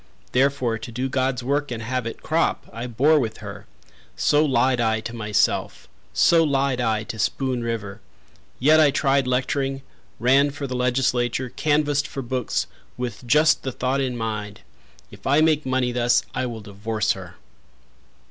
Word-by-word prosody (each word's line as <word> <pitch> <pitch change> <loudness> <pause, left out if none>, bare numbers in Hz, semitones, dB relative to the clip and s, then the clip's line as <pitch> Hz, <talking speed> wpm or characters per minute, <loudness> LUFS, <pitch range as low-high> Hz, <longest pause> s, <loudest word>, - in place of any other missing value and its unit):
Therefore 130 -3 +1
to 120 - -8
do 125 +3 -2
God's 130 -2 -1
work 145 +3 0
and 115 -2 -5
have 125 0 -2
it 115 - -7
crop, 165 +1 0
I 115 +2 -5
bore 140 +7 +3
with 115 -5 -3
her 100 -1 -9 0.5
So 150 - +3
lied 130 -3 +2
I 110 -1 +1
to 115 +1 -6
myself 105 -3 0 0.2
So 165 -1 +4
lied 135 -4 +1
I 110 -2 0
to 110 0 -7
Spoon 130 +2 -1
River! 110 -3 -4 0.6
Yet 155 +5 +5
I 155 -2 +6
tried 135 -1 +1
lecturing, 135 +1 -1 0.4
ran 135 +4 +4
for 145 0 -6
the 130 -2 -4
legislature, 125 0 0
Canvassed 145 +1 +1
for 135 - -6
books, 125 0 -1 0.3
with 125 0 -5
just 150 +5 +4
the 130 - -3
thought 130 +2 -1
in 125 -2 -2
mind: 105 -2 -4 0.5
If - - -10
I 140 +3 +4
make 155 -3 +2
money 130 -1 +1
thus, 120 0 +2
I 130 0 -1
will 115 -2 -6
divorce 105 +1 -2
her. 90 -3 -6
125 Hz, 165 wpm, -23 LUFS, 115-140 Hz, 0.6 s, I